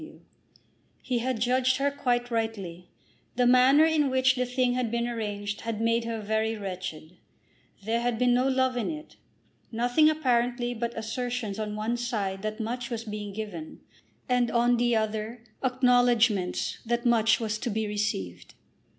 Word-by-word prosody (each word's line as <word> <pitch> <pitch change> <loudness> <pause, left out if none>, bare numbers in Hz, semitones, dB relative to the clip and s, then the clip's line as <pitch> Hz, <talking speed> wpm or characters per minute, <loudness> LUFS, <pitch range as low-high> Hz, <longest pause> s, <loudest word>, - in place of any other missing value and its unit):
W. 315 - -12 0.8
He 250 -2 -1
had 250 -1 -2
judged 255 +2 +2
her 280 +1 +1
quite 245 -3 -1
rightly. 195 -7 -3 0.5
The 245 +1 +2
manner 255 +5 +6
in 310 -3 +2
which 260 0 +3
the 250 -1 -1
thing 250 0 +1
had 250 -2 -1
been 235 +1 -1
arranged 205 -3 -4
had 225 -2 -4
made 230 +1 +1
her 230 -1 -3
very 220 +1 -1
wretched. 180 -4 -6 0.7
There 230 +2 0
had 240 -1 0
been 245 +1 +3
no 250 +2 +2
love 260 -1 +1
in 240 - -1
it; 305 -1 -8 0.5
nothing 245 +7 +3
apparently 245 -5 0
but 235 0 -4
assertions 225 -1 -3
on 210 -1 -3
one 220 +3 -1
side 205 -6 -2
that 215 +2 -4
much 235 +2 -3
was 230 -2 -4
being 210 -2 -6
given, 195 -7 -7 0.5
and 250 -1 +2
on 240 +1 +3
the 240 0 +2
other 220 +2 -2 0.2
acknowledgments 245 -6 +2
that 235 +1 -1
much 225 -2 +4
was 220 -2 -2
to 240 - -3
be 220 0 -1
received. 95 - -3
235 Hz, 160 wpm, -27 LUFS, 215-250 Hz, 0.8 s, manner